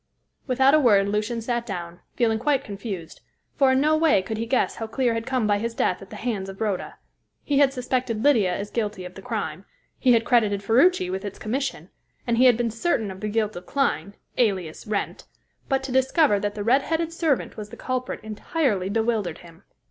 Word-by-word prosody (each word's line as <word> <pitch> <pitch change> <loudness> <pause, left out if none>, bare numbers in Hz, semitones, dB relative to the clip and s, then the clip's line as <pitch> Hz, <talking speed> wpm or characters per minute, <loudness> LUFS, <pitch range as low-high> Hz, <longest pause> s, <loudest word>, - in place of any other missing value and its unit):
Without 265 +1 +4
a 310 - +6
word 205 -8 +4
Lucian 210 +3 -1
sat 240 0 -1
down, 175 -5 -6 0.2
feeling 225 -3 +1
quite 275 +2 +1
confused, 195 -6 -7 0.3
for 270 -2 +3
in 260 - +3
no 305 +2 +3
way 310 - +3
could 220 +3 -4
he 230 - -2
guess 255 +2 +1
how 225 - -4
Clear 240 +1 0
had 230 0 -4
come 255 -4 0
by 205 -1 +2
his 230 +2 -3
death 180 - 0
at 195 - -11
the - - -9
hands 210 -4 -3
of 195 - -9
Rhoda. 205 -4 -2 0.5
He 280 -1 +1
had 280 -2 +5
suspected 250 -3 -2
Lydia 230 -11 +4
as 200 +3 -4
guilty 210 -5 -3
of 180 - -9
the 195 - -11
crime; - - -4 0.4
he 255 -2 +4
had 230 0 +3
credited 210 -5 +2
Ferruci 230 - +3
with 190 +1 -3
its 200 -2 -6
commission, 230 - -3 0.3
and 235 -1 +1
he 255 - +6
had 245 -3 +6
been 235 -1 0
certain 225 - -1
of 190 - -9
the 210 - -3
guilt 215 0 -1
of 175 +1 -9
Clyne, 200 - -1 0.2
alias 190 -9 0
Wrent; 210 -1 -3 0.4
but 270 -1 +1
to 265 - -5
discover 260 -3 +3
that 205 0 -3
the 205 - -3
red 255 +6 +4
headed 325 +3 -2
servant 320 -5 0
was 210 -2 -7
the 235 - -11
culprit 255 -1 -3
entirely 215 - -1
bewildered 220 -5 0
him. 165 -1 -16
225 Hz, 210 wpm, -24 LUFS, 200-260 Hz, 0.5 s, a